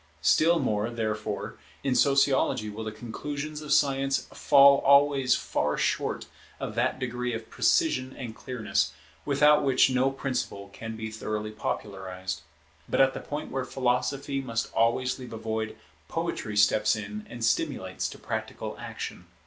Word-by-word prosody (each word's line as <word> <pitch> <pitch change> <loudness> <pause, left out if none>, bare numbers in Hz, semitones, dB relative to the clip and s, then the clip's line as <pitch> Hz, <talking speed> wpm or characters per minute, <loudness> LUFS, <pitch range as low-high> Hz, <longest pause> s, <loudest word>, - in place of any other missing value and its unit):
Still 165 - +5
more, 105 -6 0
therefore, 110 -3 -3 0.2
in 135 - +1
Sociology 135 -4 +3
will 110 +2 -6
the 110 - -4
conclusions 145 +7 -5
of 150 - -6
Science 135 -1 +2
fall 140 0 +6
always 140 -2 +5
far - - -1
short - - -1 0.3
of - - -4
that 125 +3 0
degree 125 -2 -2
of 110 0 -8
precision 135 - +2
and 115 -4 -6
clearness, 105 -10 -1 0.3
without 150 +1 +5
which 135 -1 +4
no 130 +1 +3
principle 125 -7 -3
can 115 0 -6
be 110 0 -5
thoroughly 110 -1 -4
popularized. 95 -4 -4 0.5
But - - 0
at 135 0 +5
the - - -5
point 145 +1 -5
where 135 0 -1
Philosophy 135 +2 -1
must 115 -3 -3
always 120 +3 +1
leave 125 -2 -8
a - - -5
void, 110 0 -3 0.3
Poetry 105 -1 -3
steps 105 +1 +4
in 105 0 -6
and 120 -1 -3
stimulates 115 - -1
to - - -10
practical - - -5
action. - - -7
120 Hz, 150 wpm, -27 LUFS, 110-135 Hz, 0.5 s, fall